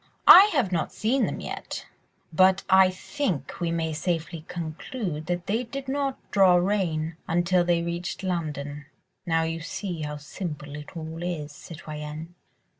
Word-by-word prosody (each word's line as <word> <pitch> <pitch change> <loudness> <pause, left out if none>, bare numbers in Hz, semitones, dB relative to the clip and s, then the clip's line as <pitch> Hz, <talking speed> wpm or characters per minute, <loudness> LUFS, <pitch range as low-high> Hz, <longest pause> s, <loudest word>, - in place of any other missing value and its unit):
I 380 +3 +12
have 255 - +1
not 170 -3 -1
seen 245 +5 +1
them - - -4
yet, - - -6 0.5
but 185 +3 +5
I 190 0 +7
think 185 - -3
we 170 - +1
may 165 -1 -1
safely 165 0 -2
conclude 165 - -5
that 175 0 -2
they 220 +5 0
did 270 +3 -6
not 275 0 -1
draw 190 -3 +6
rein 175 -4 0
until 175 +1 +2
they 175 -1 +2
reached 170 +3 -4
London. 150 -5 -3 0.4
Now 165 -1 +2
you 165 0 -2
see 180 -1 -4
how 150 0 -4
simple 150 -1 -6
it 150 +3 -9
all 160 +1 -6
is, 165 -4 -3
citoyenne!" 155 +1 -8
170 Hz, 150 wpm, -26 LUFS, 155-190 Hz, 0.5 s, I